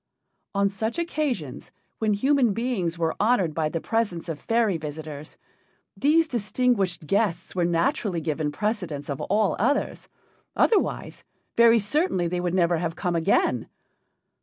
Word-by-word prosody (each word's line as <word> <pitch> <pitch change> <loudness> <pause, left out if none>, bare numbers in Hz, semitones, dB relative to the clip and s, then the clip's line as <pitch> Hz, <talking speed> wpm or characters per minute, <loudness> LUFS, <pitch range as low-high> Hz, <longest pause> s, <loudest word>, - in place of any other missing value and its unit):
On 200 0 +3
such 220 - -3
occasions, 285 - -3 0.3
when 215 -1 +2
human 260 0 +3
beings 205 -7 -1
were 165 -1 0
honored 205 -7 +2
by 155 0 0
the 165 - -2
presence 200 -5 -2
of 155 -3 -4
fairy 225 -4 +1
visitors, 155 -1 -7 0.6
these 315 +3 +3
distinguished 220 - 0
guests 195 0 0
were 180 -2 +1
naturally 170 +2 0
given 155 -1 -2
precedence 170 -6 -3
of 140 - -4
all 205 0 +1
others, 275 +7 0 0.5
otherwise 435 - +1 0.3
very 235 0 +6
certainly 215 - +1
they 175 +1 -2
would 175 0 -1
never 175 -2 +3
have 165 -1 -2
come 175 -2 -1
again. 145 -7 +1
190 Hz, 135 wpm, -25 LUFS, 165-230 Hz, 0.6 s, very